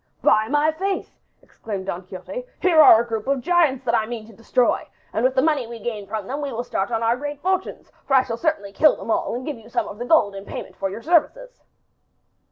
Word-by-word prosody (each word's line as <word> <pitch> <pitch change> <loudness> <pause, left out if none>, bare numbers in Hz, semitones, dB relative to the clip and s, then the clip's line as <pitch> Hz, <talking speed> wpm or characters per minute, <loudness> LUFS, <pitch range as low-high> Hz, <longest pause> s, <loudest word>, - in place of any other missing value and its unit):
"By 215 0 +4
my 295 +4 +2
faith!" 385 +5 -3 0.3
exclaimed 200 -4 -7
Don 185 -1 -4
Quixote, 190 - -7
"here 335 -4 +5
are 225 - +9
a - - -12
group 225 0 -4
of 275 -2 +1
giants 310 -6 +2
that 235 - +1
I 220 -2 +2
mean 230 -2 -6
to 225 - -15
destroy, 235 +3 0 0.3
and 220 - -1
with 260 +1 +2
the 260 - +3
money 300 -6 +1
we 235 0 -8
gain 215 -2 -5
from 210 -1 -4
them 275 +6 -4
we 285 -2 -3
will 240 0 -3
start 195 -3 -2
on 230 -1 -1
our 230 +1 +3
great 290 +2 -6
fortunes, 375 +3 -2 0.2
for 270 - +3
I 260 - +6
certainly 235 -4 -2
shall - - -24
kill 305 - +6
them 230 - -5
all - - 0
and 255 +1 -5
give 295 -6 -5
you 225 +1 -16
some - - -1
of 210 - -9
the 245 - -4
gold 245 -9 +3
in 195 0 -7
payment - - -8
for 195 - -2
your 215 +4 -8
services." - - 0
245 Hz, 245 wpm, -22 LUFS, 220-300 Hz, 0.3 s, are